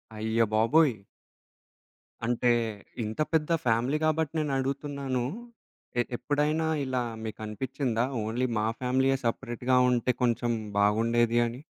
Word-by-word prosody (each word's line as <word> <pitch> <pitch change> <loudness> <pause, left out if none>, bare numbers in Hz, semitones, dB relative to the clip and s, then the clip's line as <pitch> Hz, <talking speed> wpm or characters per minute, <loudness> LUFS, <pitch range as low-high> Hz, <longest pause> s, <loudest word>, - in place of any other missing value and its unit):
అయ్య 110 +1 +1
బాబోయ్! 125 +3 +4 1.3
అంటే 120 +1 +2 0.5
ఇంత 110 +6 -5
పెద్ద 160 0 +2 0.2
ఫ్యామిలీ 120 +5 +2
గాబట్టి 155 -1 +1
నేనడుగుతున్నాను. 140 -2 -2 0.8
ఎ - - +6 0.2
ఎప్పుడైనా 150 +2 0 0.2
ఇలా 130 -1 -1 0.2
మీకనిపిచ్చిందా? 115 +3 -2 0.2
ఓన్లీ 120 +4 0
మా 105 - +1
ఫ్యామిలీయే 130 +1 +2
సెపరేట్‌గా 120 +1 0
ఉంటే 125 +1 +2
కొంచెం 120 0 +1 0.3
బాగుండేది 115 +3 +3
అని? 120 +2 -5
125 Hz, 100 wpm, -28 LUFS, 115-140 Hz, 1.3 s, ఎ